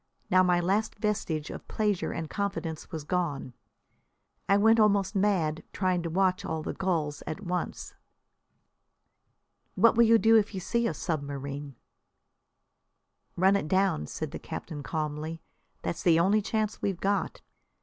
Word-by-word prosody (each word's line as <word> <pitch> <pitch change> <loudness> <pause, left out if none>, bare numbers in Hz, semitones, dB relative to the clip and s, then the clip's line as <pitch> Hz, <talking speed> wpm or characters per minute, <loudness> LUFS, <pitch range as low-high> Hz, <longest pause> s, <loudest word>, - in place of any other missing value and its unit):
Now 185 0 +6
my 180 -1 +3
last 200 +5 0
vestige 195 -8 -2
of - - -9
pleasure 210 -4 0
and 165 -1 -4
confidence 185 -5 -4
was 160 -3 -5
gone. 150 -6 -2 1.0
I 200 - +6
went 225 +2 +5
almost 200 -2 +3
mad 185 -6 +1
trying 185 -2 +1
to 170 - -3
watch 185 +2 +1
all 160 -4 -3
the - - -3
gulls 155 -6 -1
at 155 +6 -4
once. 180 -2 -4 1.8
"What 230 +4 +5
will 235 +1 +6
you 230 0 +6
do 225 0 +5
if 215 -1 +1
you - - -2
see 235 +5 0
a - - -2
submarine?' 140 -3 -4 1.6
"Run 190 +3 +4
it 200 - -1
down," 185 - +1
said - - -5
the - - -6
captain 150 -3 -6
calmly. 155 +1 -3 0.4
"That's 85 - -3
the 165 -2 +4
only 200 +5 +3
chance 215 0 -2
we've 195 -3 -1
got. 200 +1 -1
185 Hz, 150 wpm, -28 LUFS, 155-205 Hz, 1.8 s, Now